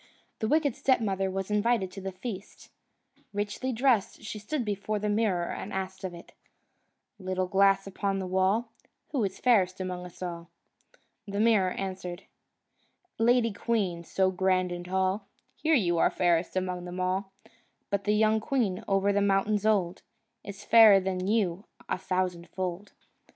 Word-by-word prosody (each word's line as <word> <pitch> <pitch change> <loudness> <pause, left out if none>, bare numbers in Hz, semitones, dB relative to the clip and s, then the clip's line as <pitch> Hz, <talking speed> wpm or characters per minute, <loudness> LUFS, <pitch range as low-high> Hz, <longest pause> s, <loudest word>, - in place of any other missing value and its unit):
The 220 - -1
wicked 295 -1 +2
stepmother 200 -7 +1
was 195 +1 -4
invited 210 -2 +1
to 195 - -8
the 190 0 -4
feast. 195 +1 -8 0.6
Richly 205 +6 -2
dressed, 240 -4 +1
she 215 0 -6
stood 245 +4 -3
before 210 +1 -2
the 210 +1 -2
mirror, 205 -5 +1
and 205 - -6
asked 190 0 -4
of 185 -2 -4
it: 170 - -13 0.9
"Little 185 -1 -1
glass 195 +1 +3
upon 195 0 -2
the 190 - -3
wall, 190 +5 +1 0.4
Who 270 -6 0
is 190 -1 -2
fairest 195 -7 +3
among 180 -1 -4
us 180 - -11
all?" 170 -1 -6 0.8
The 200 0 -3
mirror 215 -4 +4
answered: 185 -1 -5 1.0
"Lady 230 -1 +3
queen, 200 -6 -1
so 185 +2 +1
grand 185 -1 +1
and 175 0 -5
tall, 190 +2 -1 0.3
Here, 320 0 +2
you 175 - +2
are - - +4
fairest 175 -1 +1
among 180 -1 -2
them 180 +1 -6
all; 190 +2 -1 0.6
But 200 0 -1
the 210 0 +2
young 220 0 +3
queen 215 -5 -1
over 195 0 +2
the 205 - +2
mountains 200 +1 +2
old, 190 -4 +1 0.4
Is 200 0 -9
fairer 220 -4 +8
than 185 -1 -2
you 200 -3 0 0.2
a - - -2
thousandfold." 185 +1 -3
195 Hz, 155 wpm, -28 LUFS, 185-215 Hz, 1.0 s, fairer